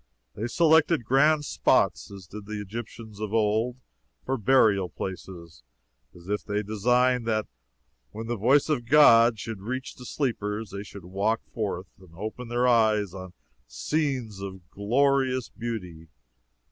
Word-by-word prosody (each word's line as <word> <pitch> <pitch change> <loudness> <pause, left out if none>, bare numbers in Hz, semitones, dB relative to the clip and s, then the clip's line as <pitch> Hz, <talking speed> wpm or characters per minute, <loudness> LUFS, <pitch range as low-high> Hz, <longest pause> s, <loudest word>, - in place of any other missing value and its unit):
They 110 - -4
selected 160 -1 +3
grand 145 +4 +3
spots, - - +1
as 100 -2 -11
did 100 +2 -10
the 105 -1 -5
Egyptians 110 +1 -8
of 110 0 -3
old, 110 +3 +1 0.5
for 135 - 0
burial 105 -6 +3
places, 85 -3 -8 0.5
as 85 0 -15
if 105 +1 -2
they 105 +1 -2
designed 125 +3 +1
that 110 -1 0 0.6
when 110 +2 -7
the 120 +1 -2
voice 130 +7 +3
of 130 -7 -1
God 120 -6 +7
should 105 -1 -6
reach 130 +5 -5
the 125 - -12
sleepers, 110 -6 -3
they 100 - -5
should 100 -3 -11
walk 100 +5 -1
forth 95 -5 -4
and 90 -3 -18
open 110 +6 -6
their 120 +1 +1
eyes 110 -5 +3
on 95 -2 -9 0.3
scenes 130 - -2
of 95 -2 -8
glorious 130 +4 +1
beauty. 90 -9 -6
110 Hz, 145 wpm, -26 LUFS, 100-125 Hz, 0.6 s, God